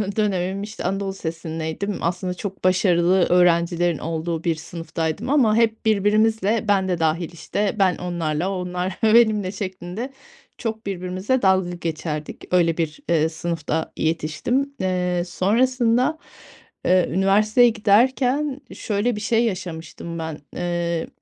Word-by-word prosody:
dönemim, 195 -2 0
işte, 210 +1 -7
anadolu 195 +1 -1
lisesindeydim, 165 +2 -4
aslında 180 +2 -1
çok 195 +1 -7
başarılı 185 -1 +3
öğrencilerin 175 -1 +3
olduğu 165 +1 -3
bir 170 -2 +1
sınıftaydım 165 +5 -4
ama 255 -7 +4
hep 225 0 +1
birbirimizle 215 +1 +2
ben 195 -2 +2
de 175 -2 0
dâhil, 165 +1 0
işte, 200 +5 -2
ben 185 -3 +4
onlarla 170 -1 -2
o - - -2
onlar 180 +1 -3
benimle 215 -4 +4
şeklinde 190 +5 -5 0.5
çok 220 -1 -4
birbirimizle 190 +6 -1
dalga 190 -2 +3
geçerdik. 160 -3 -5
Öyle 170 -2 +3
bir, 160 -2 -2
eee, 160 -1 +3
sınıfta 160 -1 -3
yetiştim. 165 - -1
Eee, 180 -1 0
sonrasında, 245 - +2 0.7
eee, 185 -1 +4
üniversiteye 210 +6 +4
giderken 255 +6 +2
şöyle 210 +2 -1
bir 210 - -5
şey 225 +2 +2
yaşamıştım 170 -4 -5
ben, 160 -2 -4 0.2
eee, 175 -1 -2
185 Hz, 125 wpm, -22 LUFS, 170-215 Hz, 0.7 s, ama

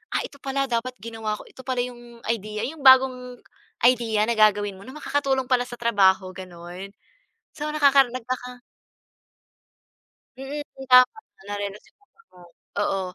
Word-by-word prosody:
ah, - - +2
ito 280 - -12
pala 275 0 -1
dapat 250 +1 -2
ginawa 225 -1 -4
ko. - - -10
Ito 260 - -13
pala 255 -1 0
yung 240 -1 -10
idea, 215 -1 -2
yung 315 +2 -9
bagong 255 -1 +5 0.5
idea 230 -4 +3
na - - +1
gagawin 205 -2 +3
mo 200 - -14
na 265 - -10
makakatulong 275 -3 0
pala 245 -1 +2
sa 240 - -8
trabaho 190 -5 +3
ganon. 180 +1 -9 0.7
So 300 0 -4
nakaka 280 -3 +5
nagkaka. 250 0 -6 1.8
Mm, 280 +2 -5 0.2
tama 255 - +6 0.3
nare-relax 205 0 -5
yung - - -61
utak 460 - -29
mo, 180 - -18 0.4
oo. 195 -1 0
245 Hz, 145 wpm, -24 LUFS, 210-260 Hz, 1.8 s, tama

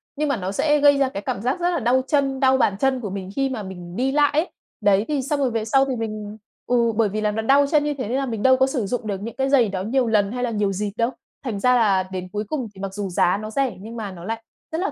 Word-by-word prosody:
nhưng 300 +1 -1
mà 275 - +1
nó 185 0 -3
sẽ 295 +8 +2
gây 285 0 +6
ra 275 -2 +2
cái 200 - -5
cảm 195 - -3
giác 255 - -1
rất 350 - +1
là 340 - 0
đau 255 +2 +2
chân, 275 -3 +1
đau 265 -1 +4
bàn 205 -6 +2
chân 265 0 +2
của 205 - -4
mình 190 -1 -5
khi 270 -1 +1
mà 230 -6 -4
mình 180 -2 -9
đi 260 +3 0
lại 290 0 +3
ấy. 315 +5 +1 0.3
Đấy, 205 0 +3
thì 290 -3 0
xong 285 +2 -1
rồi 260 -3 +1
về 220 -1 -2
sau 270 +4 +3
thì 265 -2 -2
mình 215 -2 -5 0.3
ừ, 235 -2 +2
bởi 220 -2 +2
vì 215 +2 -3
là 210 - +1
nó 220 +1 -2
đau 275 +5 +4
chân 295 0 +3
như 295 - 0
thế, 260 -6 -5
nên 250 - -1
là 275 - 0
mình 225 -5 -4
đâu 260 0 +6
có 265 - +3
sử 265 -5 -2
dụng 225 +1 -3
được 195 -1 -3
những 230 +2 -6
cái 270 +1 0
giày 255 -6 +4
đó 190 -1 -3
nhiều 245 +3 +1
lần 210 -2 +2
hay 250 +1 -3
là 245 - 0
nhiều 205 -2 0
dịp 205 +2 -2
đâu. 230 +1 +2 0.3
Thành 225 -7 -3
ra 250 +4 +4
là 200 -6 +3
đến 185 -1 -4
cuối 210 +1 -2
cùng 260 -1 -3
thì 190 - -11
mặc 195 -1 -4
dù 200 -1 -4
giá 175 +1 +2
nó 215 +1 -6
rẻ, 255 -7 -1
nhưng 225 +3 -8
mà 210 -3 -4
nó 175 -2 -10
lại 225 +3 -4 0.3
rất 320 - -2
là 390 - -1
230 Hz, 315 wpm, -22 LUFS, 205-270 Hz, 0.3 s, gây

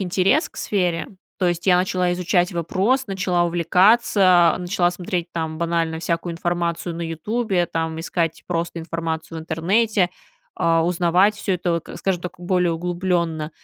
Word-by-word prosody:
интерес 190 - +2
к - - -22
сфере. 175 -5 -1 0.3
То 185 - +1
есть 175 +1 -3
я 180 -2 +6
начала 180 0 +1
изучать 180 0 +1
вопрос, 195 - 0
начала 185 -2 0
увлекаться, 180 +1 +4
начала 175 -1 +1
смотреть 175 -1 -4
там 160 -1 -3
банально 165 -1 -1
всякую 170 +1 -2
информацию 170 0 -2
на 170 - -5
"Ютубе", 180 +3 -1
там 160 -1 -3
искать 165 -1 -2
просто 170 -1 -2
информацию 165 0 -4
в - - -6
интернете, 185 +5 +1 0.5
а 165 0 +2
узнавать 180 +4 +3
всё 205 - -2
это, 175 -1 -1
вот, 170 -1 -3
скажем 185 -3 -1
так, 180 - -5
более 180 -1 +1
углублённо. 170 -2 -1
175 Hz, 150 wpm, -22 LUFS, 165-185 Hz, 0.5 s, я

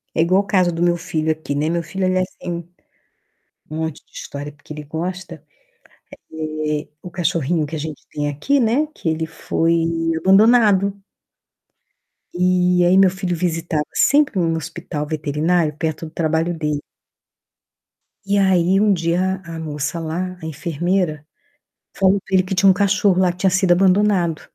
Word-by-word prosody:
é 165 - +3
igual 185 +4 +3
o - - -17
caso 185 -3 +2
do 165 +1 -4
meu 175 0 +2
filho 160 -1 -1
aqui, 155 -2 -4
né, 150 +2 0
meu 170 0 -1
filho 190 +1 -3
ele 185 0 +1
é - - +3
assim, 175 -2 -6 1.0
um 155 - -5
monte 160 -2 -4
de - - -36
história, 145 +1 -7
porque 145 +1 -12
ele 150 0 -7
gosta, 170 +1 -6 0.9
eh, 155 -1 -3
o 180 - -8
cachorrinho 165 -2 0
que 160 +2 -6
a - - -3
gente 155 0 -6
tem 145 -1 -2
aqui, 265 - 0
né, 245 +7 +2
que 165 - -4
ele 160 0 -1
foi 165 +1 -1 0.4
abandonado. 200 0 +4 1.3
E 180 0 +2
aí 185 +2 +4
meu 195 -1 +6
filho 185 -1 -3
visitava 165 -2 -1
sempre 285 -8 +3
em - - +2
um 165 0 +1
hospital 160 -1 -5
veterinário 155 +1 0
perto 160 0 -3
do 155 - -10
trabalho 165 +1 -1
dele. 150 -2 -2 1.4
E 200 +1 +1
aí 190 -1 +3
um 210 -1 +4
dia 180 +2 0
a 165 -1 -8
moça 150 +1 -3
lá, 180 +3 -4
a - - -7
enfermeira, 160 0 -2 0.7
falou 195 0 +3
para 190 - -12
ele 185 - +4
que 190 +1 -4
tinha 195 +1 +4
um - - +7
cachorro 200 -1 +2
lá, 180 -1 +3
que 175 - -14
tinha 190 - +3
sido 185 0 +2
abandonado. 185 -3 +3
175 Hz, 170 wpm, -20 LUFS, 160-190 Hz, 1.4 s, um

